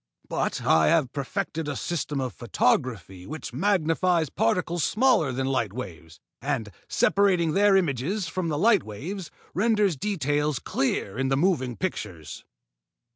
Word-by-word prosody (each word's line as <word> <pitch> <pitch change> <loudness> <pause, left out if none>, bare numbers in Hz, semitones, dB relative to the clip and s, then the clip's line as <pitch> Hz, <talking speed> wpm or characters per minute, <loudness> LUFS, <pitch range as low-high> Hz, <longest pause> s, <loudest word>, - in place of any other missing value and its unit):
But - - -2
I 80 0 +5
have 155 -6 +2
perfected 160 +2 -3
a 145 - -2
system 150 -2 -2
of 130 -2 -3
photography 100 -5 -1
which 155 -4 -7
magnifies 170 -1 +1
particles 170 +6 0
smaller 215 - +3
than 130 +1 -2
light 125 -7 0
waves, 85 -8 -8 0.2
and, 130 -5 -2 0.2
separating 185 -5 +3
their 200 +2 +5
images 170 - -1
from 180 +1 -2
the 150 -2 -1
light 210 +2 +4
waves, 165 - -6 0.2
renders 210 -2 +2
detail 150 -4 0
clear 120 -4 -2
in 135 - +1
the 135 0 +1
moving 140 -7 +1
pictures." 85 - -5
150 Hz, 135 wpm, -26 LUFS, 125-185 Hz, 0.2 s, I